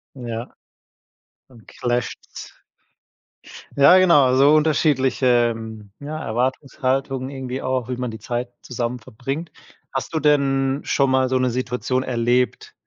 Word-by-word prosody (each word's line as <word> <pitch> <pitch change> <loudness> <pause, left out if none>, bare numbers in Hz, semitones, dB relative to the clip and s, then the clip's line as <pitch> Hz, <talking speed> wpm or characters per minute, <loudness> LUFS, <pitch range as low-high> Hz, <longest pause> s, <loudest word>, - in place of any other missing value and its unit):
Ja. 120 -1 -6 1.0
Dann 120 -4 -18
clasht 120 -1 -2
es. - - -11 1.2
Ja, 175 +7 +7
genau, 145 -8 +5
so 140 +3 +5
unterschiedliche, 130 -6 +2 0.4
ja, 155 +2 -6
Erwartungshaltungen 130 +2 -2
irgendwie 130 -1 -5
auch, 130 -2 -2
wie 125 -1 -4
man 125 -1 -3
die 110 - -7
Zeit 120 0 -4
zusammen 125 0 -3
verbringt. 135 +8 -6 0.4
Hast 135 - -3
du - - +2
denn 135 -2 +2
schon 135 -2 +1
mal 130 -1 +2
so 130 - +2
'ne 130 -1 +1
Situation 130 +1 -2
erlebt, 125 0 0
130 Hz, 125 wpm, -21 LUFS, 125-135 Hz, 1.2 s, Ja